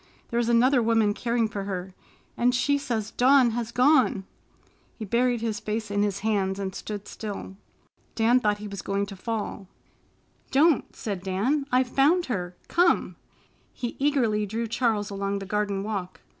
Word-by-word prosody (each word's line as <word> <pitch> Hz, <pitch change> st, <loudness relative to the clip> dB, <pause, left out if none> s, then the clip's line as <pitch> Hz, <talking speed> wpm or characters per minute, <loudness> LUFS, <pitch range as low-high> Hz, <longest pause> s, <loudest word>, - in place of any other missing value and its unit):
There 235 Hz, -, +1 dB
is 235 Hz, -1 st, 0 dB
another 245 Hz, +2 st, +4 dB
woman 225 Hz, -2 st, +2 dB
caring 235 Hz, 0 st, 0 dB
for 200 Hz, -2 st, -5 dB
her 190 Hz, -1 st, -5 dB, 0.4 s
and 245 Hz, +1 st, +2 dB
she 285 Hz, +3 st, +2 dB
says 230 Hz, -6 st, -3 dB
Dawn 255 Hz, -1 st, +5 dB
has 230 Hz, 0 st, -3 dB
gone." 250 Hz, -6 st, +3 dB, 0.7 s
He 220 Hz, -, -5 dB
buried 240 Hz, +3 st, +1 dB
his 225 Hz, -2 st, -2 dB
face 215 Hz, 0 st, -4 dB
in 205 Hz, 0 st, +1 dB
his 200 Hz, -1 st, -1 dB
hands 195 Hz, -3 st, 0 dB
and 195 Hz, -1 st, -4 dB
stood 205 Hz, 0 st, -6 dB
still. 205 Hz, -3 st, -7 dB, 0.6 s
Dan 235 Hz, +2 st, +4 dB
thought 210 Hz, -3 st, +1 dB
he 210 Hz, 0 st, -7 dB
was 200 Hz, -1 st, -6 dB
going 200 Hz, 0 st, -1 dB
to 200 Hz, 0 st, -9 dB
fall. 205 Hz, -1 st, -4 dB, 0.8 s
"Don't!" 295 Hz, +2 st, +3 dB
said 200 Hz, -5 st, -4 dB
Dan. 225 Hz, +10 st, 0 dB
"I've 255 Hz, +1 st, +4 dB
found 300 Hz, +8 st, +3 dB
her. 180 Hz, -2 st, -4 dB
Come!" 350 Hz, 0 st, +2 dB, 0.6 s
He 240 Hz, -2 st, -5 dB
eagerly 240 Hz, -8 st, +1 dB
drew 225 Hz, +3 st, -2 dB
Charles 225 Hz, -3 st, 0 dB
along 200 Hz, 0 st, -2 dB
the 195 Hz, -, -6 dB
garden 200 Hz, -1 st, -1 dB
walk. 200 Hz, -4 st, -5 dB
220 Hz, 165 wpm, -26 LUFS, 200-245 Hz, 0.8 s, Dawn